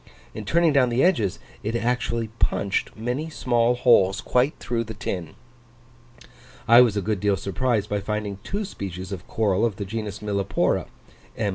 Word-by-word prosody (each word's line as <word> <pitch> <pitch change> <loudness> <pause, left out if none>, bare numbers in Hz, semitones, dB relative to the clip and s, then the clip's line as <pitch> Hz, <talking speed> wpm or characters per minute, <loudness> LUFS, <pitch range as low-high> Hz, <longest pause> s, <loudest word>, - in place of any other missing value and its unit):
In 110 - -7
turning 170 +4 +3
down 130 -3 +4
the 120 +2 +2
edges, 115 - +2 0.2
it 110 +3 -3
actually 115 -1 -1
punched 100 -1 0
many 125 +8 -3
small 120 -5 +1
holes 105 -6 +4
quite 125 +7 +1
through 115 -1 -2
the 110 0 -7
tin! 90 -6 -5 1.3
I 120 +2 +9
was 115 -4 +3
a 100 - -1
good 105 -1 -1
deal 100 0 +1
surprised 105 +4 -1
by 105 0 -1
finding 105 -1 -3
two 205 +2 -3
species 95 - -7
of 90 -3 -7
coral 105 -2 +1
of 115 -4 +1
the 100 - -5
genus 105 0 -4
Millepora 100 -2 0 0.5
(M. 105 -2 0
110 Hz, 165 wpm, -24 LUFS, 100-125 Hz, 1.3 s, I